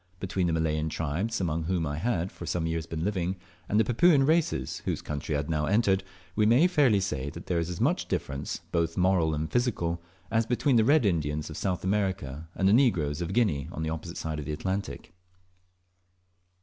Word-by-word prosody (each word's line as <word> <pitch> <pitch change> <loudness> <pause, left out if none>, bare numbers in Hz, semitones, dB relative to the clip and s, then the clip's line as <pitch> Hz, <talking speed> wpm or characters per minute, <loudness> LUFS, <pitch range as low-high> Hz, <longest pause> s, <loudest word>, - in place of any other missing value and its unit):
Between 95 -1 -1
the 85 - 0
Malayan 80 -1 0
tribes, 85 +9 -2
among 80 -3 -1
whom 85 -1 0
I 75 0 -3
had 95 -4 -1
for 85 - -9
some 85 +1 -1
years 80 -1 -2
been 80 -1 -4
living, 95 -2 -1 0.3
and 105 - +3
the - - +5
Papuan 135 +6 +4
races, 160 +2 +1
whose - - -1
country 75 +1 -4
I - - +2
had 75 +1 -3
now 75 -1 0
entered, 100 -1 +2 0.3
we 105 0 +3
may 120 +9 +5
fairly 145 - +4
say 70 -8 -2
that - - -9
there 85 -2 0
is 85 +1 -2
as 90 - -5
much - - +1
difference, 70 +1 -3
both 85 -1 0
moral 90 -4 +3
and 80 +1 -3
physical, 85 -9 0 0.3
as 115 0 +2
between 125 +2 +2
the 110 - +5
red 145 -1 +4
Indians 75 -4 -1
of 75 - -7
South 95 -3 -2
America 95 -7 -1
and 95 - +2
the 100 - +5
negroes 90 - +2
of 85 +1 -3
Guinea 95 - +1
on 80 - -4
the 80 - -2
opposite 85 +2 -6
side 80 -1 -3
of 75 - -5
the 75 - -3
Atlantic. 95 0 -4
90 Hz, 205 wpm, -28 LUFS, 80-105 Hz, 0.3 s, the